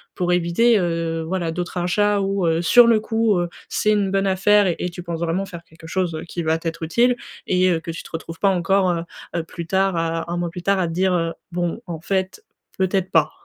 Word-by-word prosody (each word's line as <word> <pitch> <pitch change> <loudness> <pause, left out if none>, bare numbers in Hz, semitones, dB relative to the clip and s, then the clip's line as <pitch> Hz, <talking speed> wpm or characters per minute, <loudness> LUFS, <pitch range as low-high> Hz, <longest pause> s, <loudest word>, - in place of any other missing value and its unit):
pour 180 -1 0
éviter, 180 +6 +3
heu, 165 -2 -1
voilà 175 -2 -1
d'autres 175 +2 -4
achats 200 +4 +1
ou 195 -2 0
heu, 165 +1 +1
sur 235 +8 +7
le 225 -2 +4
coup, 225 -3 +1
heu, 175 0 -1 0.2
c'est 215 - +1
une 205 -2 +2
bonne 195 0 +1
affaire 195 0 +3
et 180 - -2
tu 175 0 -9
penses 170 -2 -4
vraiment 170 +3 -1
faire 170 -3 -9
quelque 160 0 -17
chose 175 -2 -1
qui 170 - -4
va 160 +1 +1
t'être 165 0 -5
utile 240 +10 +2 0.3
et 185 0 +2
heu, 165 - +1
que 165 - -5
tu 165 - -7
te - - -12
retrouves 165 0 -7
pas 200 - +3
encore 190 +1 +2
heu, 170 -1 -1 0.3
heu 170 - 0
plus 170 0 -8
tard 190 0 +1
à 165 +1 -2
1 175 - -2
mois 175 -1 -1
plus 175 +1 -8
tard 195 0 +2
à 175 - +1
te 165 - -4
dire 185 +1 +2
heu: 165 -1 0 0.2
«Bon 175 +5 -2
en 165 -2 -5
fait, 190 - -2 0.4
peut-être 190 0 0
pas». 160 -2 +4
180 Hz, 235 wpm, -21 LUFS, 165-195 Hz, 0.4 s, sur